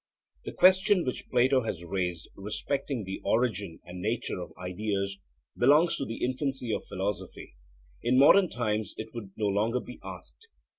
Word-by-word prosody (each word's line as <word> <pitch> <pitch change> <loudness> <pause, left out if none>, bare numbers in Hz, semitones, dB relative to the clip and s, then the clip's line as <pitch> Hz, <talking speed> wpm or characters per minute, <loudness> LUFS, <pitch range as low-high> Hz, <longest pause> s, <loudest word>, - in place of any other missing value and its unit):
The - - -4
question 190 +1 +5
which 125 - -4
Plato 130 +1 +4
has 90 -7 -4
raised 90 -2 -2
respecting 130 +5 -3
the 95 0 -6
origin 105 -7 0
and 90 +1 -9
nature 110 -2 -2
of - - -8
ideas 100 +1 -3 0.4
belongs 150 +7 +5
to 135 - -2
the 115 - -3
infancy 130 -2 -2
of - - -3
philosophy; 95 -1 -4 0.5
in 125 +2 +2
modern 175 +7 +7
times 110 -3 -2
it 110 0 -7
would 115 -5 -7
no 110 - 0
longer 105 +5 +1
be 125 - -10
asked. 455 - -10
110 Hz, 155 wpm, -29 LUFS, 100-130 Hz, 0.5 s, modern